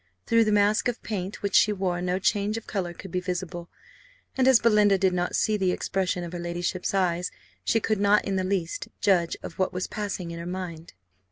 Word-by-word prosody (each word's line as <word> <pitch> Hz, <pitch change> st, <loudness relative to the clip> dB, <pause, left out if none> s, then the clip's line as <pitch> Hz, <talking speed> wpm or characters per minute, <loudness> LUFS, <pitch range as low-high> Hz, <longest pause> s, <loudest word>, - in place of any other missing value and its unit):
Through 230 Hz, -1 st, +4 dB
the 215 Hz, -, +1 dB
mask 210 Hz, +2 st, +3 dB
of 245 Hz, -1 st, -2 dB
paint 195 Hz, -1 st, -4 dB
which 200 Hz, -, -1 dB
she 215 Hz, -, +5 dB
wore 185 Hz, -3 st, -1 dB
no 180 Hz, +1 st, 0 dB
change 205 Hz, +2 st, 0 dB
of 225 Hz, -, -7 dB
colour 185 Hz, -4 st, -3 dB
could 175 Hz, +2 st, -10 dB
be 180 Hz, -, 0 dB
visible; 180 Hz, -1 st, -4 dB, 0.7 s
and 260 Hz, -1 st, +3 dB
as 260 Hz, -3 st, +7 dB
Belinda 210 Hz, -3 st, +4 dB
did 190 Hz, -1 st, +2 dB
not 175 Hz, 0 st, -1 dB
see 215 Hz, -1 st, +2 dB
the 190 Hz, -2 st, +1 dB
expression 185 Hz, -1 st, -1 dB
of 170 Hz, 0 st, -7 dB
her 175 Hz, -, -4 dB
ladyship's 175 Hz, +2 st, -2 dB
eyes, 180 Hz, -2 st, +1 dB, 0.3 s
she 225 Hz, -, +2 dB
could 215 Hz, -1 st, 0 dB
not 205 Hz, +1 st, +4 dB
in 195 Hz, -, -1 dB
the 190 Hz, -, 0 dB
least 185 Hz, -3 st, -2 dB
judge 175 Hz, -4 st, +2 dB
of -, -, -8 dB
what 185 Hz, -, +1 dB
was 180 Hz, 0 st, -2 dB
passing 195 Hz, -5 st, -4 dB
in 170 Hz, -, -6 dB
her 170 Hz, -, -6 dB
mind. 175 Hz, -3 st, -6 dB
190 Hz, 215 wpm, -26 LUFS, 175-205 Hz, 0.7 s, as